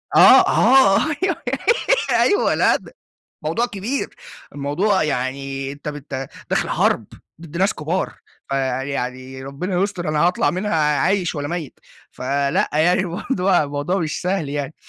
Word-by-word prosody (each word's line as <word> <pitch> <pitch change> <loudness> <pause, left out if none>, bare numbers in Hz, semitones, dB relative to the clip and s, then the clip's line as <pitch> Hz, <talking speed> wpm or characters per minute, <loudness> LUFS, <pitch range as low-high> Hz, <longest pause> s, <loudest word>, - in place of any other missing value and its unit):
آه، - - +9
آه 255 -8 +5 0.2
أيوه، 370 -4 +2 0.9
أيوه 410 +2 +3
لأ، - - +4
ده - - -8 0.5
موضوع 240 +1 0
كبير، 225 +6 -3 0.5
الموضوع 155 +9 +1
يعني 135 -1 -3
أنتَ 145 +1 -8
بت 140 -3 -6 0.2
داخل - - +1
حرب - - +1 0.3
ضد 165 0 -9
ناس 195 +3 +2
كبار، 165 +5 -2 0.3
فيعني 130 -1 -3
ربنا 175 +7 -2
يستر 180 -5 -2
أنا 155 0 0
هاطلع 180 - +2
منها 195 +2 -2
عايش 160 +5 +1
والّا 145 -1 -3
ميّت؟ 170 -5 -5 0.3
فلأ 140 +2 0
يعني 175 +5 +3
برضه 180 - 0
الموضوع 145 +6 -2
مش 155 -4 -3
سهل 180 -5 -1
يعني، 145 +1 -4
155 Hz, 135 wpm, -21 LUFS, 140-185 Hz, 0.9 s, آه